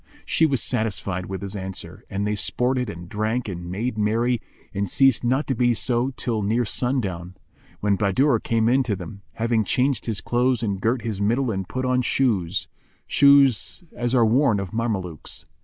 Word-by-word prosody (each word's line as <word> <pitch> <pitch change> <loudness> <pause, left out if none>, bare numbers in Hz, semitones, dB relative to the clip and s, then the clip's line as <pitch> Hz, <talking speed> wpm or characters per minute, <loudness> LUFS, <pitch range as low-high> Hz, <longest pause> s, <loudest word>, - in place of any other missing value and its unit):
She 160 - +3
was 135 -6 0
satisfied 100 -4 -2
with 95 0 -5
his 100 +1 -5
answer, 95 0 -6
and 100 0 -2
they 105 - 0
sported 125 +3 0
and 85 -3 -8
drank 110 +5 -2
and 85 -3 -6
made 110 +5 -3
merry 115 +3 +1 0.3
and 100 -1 -2
ceased 135 0 +3
not 130 +5 +1
to 135 - -1
be 120 -1 +2
so 120 +2 +1
till 115 -3 -1
near 115 +4 +1
sundown, 95 -9 -2 0.5
when 100 -1 +2
Bahadur 115 +6 +2
came 115 0 +1
in 130 +3 +4
to 115 -5 -1
them, 100 +2 -9
having 115 -1 +1
changed 130 +5 0
his 110 -3 -1
clothes 120 0 +1
and 100 -3 -2
girt 115 +2 0
his 110 -3 -3
middle 120 +4 +1
and 95 -2 -4
put 130 0 -2
on 125 0 +2
shoes, 105 -9 0 0.4
such 140 - +4
as 120 +1 -1
are 120 -2 +5
worn 115 -1 +3
of 100 0 -5
Mamelukes. 100 -9 -3
110 Hz, 180 wpm, -23 LUFS, 100-125 Hz, 0.5 s, are